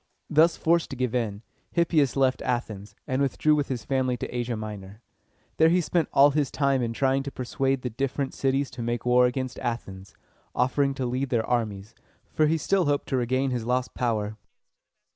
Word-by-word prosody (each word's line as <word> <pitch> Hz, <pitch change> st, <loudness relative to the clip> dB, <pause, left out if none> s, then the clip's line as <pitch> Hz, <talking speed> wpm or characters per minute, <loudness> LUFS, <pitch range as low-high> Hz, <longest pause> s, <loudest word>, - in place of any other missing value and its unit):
Thus 160 Hz, +2 st, +4 dB
forced 170 Hz, 0 st, +2 dB
to -, -, -5 dB
give 125 Hz, -2 st, -1 dB
in, 110 Hz, -4 st, -2 dB, 0.3 s
Hippias 160 Hz, -6 st, +2 dB
left 135 Hz, -1 st, +2 dB
Athens, 110 Hz, -5 st, -3 dB
and 130 Hz, +1 st, -1 dB
withdrew 140 Hz, +2 st, +2 dB
with 145 Hz, -2 st, +1 dB
his 120 Hz, -6 st, -4 dB
family 130 Hz, -1 st, 0 dB
to 120 Hz, -, -6 dB
Asia 120 Hz, -1 st, -2 dB
Minor. 105 Hz, -2 st, -8 dB, 0.6 s
Here 160 Hz, 0 st, +6 dB
he 175 Hz, +2 st, +3 dB
spent 170 Hz, -2 st, 0 dB
all 145 Hz, +1 st, +6 dB
his 145 Hz, -2 st, 0 dB
time 140 Hz, -2 st, +1 dB
in 115 Hz, -1 st, -1 dB
trying 135 Hz, +3 st, +1 dB
to 140 Hz, 0 st, -6 dB
persuade 135 Hz, +1 st, -1 dB
the 125 Hz, -, -3 dB
different 135 Hz, +3 st, -2 dB
cities 135 Hz, 0 st, 0 dB
to 120 Hz, -, -7 dB
make 120 Hz, 0 st, -2 dB
war 125 Hz, 0 st, +5 dB
against 130 Hz, 0 st, -4 dB
Athens, 100 Hz, -6 st, -5 dB, 0.4 s
offering 135 Hz, +2 st, +1 dB
to 130 Hz, -, -2 dB
lead 130 Hz, +2 st, -2 dB
their 115 Hz, -4 st, +1 dB
armies, 110 Hz, -3 st, -2 dB, 0.4 s
for 155 Hz, -, +3 dB
he 160 Hz, +2 st, +2 dB
still 190 Hz, +3 st, +1 dB
hoped 145 Hz, -1 st, 0 dB
to 135 Hz, -, 0 dB
regain 130 Hz, +2 st, 0 dB
his 120 Hz, -2 st, -2 dB
lost 125 Hz, +2 st, -1 dB
power. 110 Hz, -3 st, -1 dB
130 Hz, 190 wpm, -26 LUFS, 120-140 Hz, 0.6 s, Here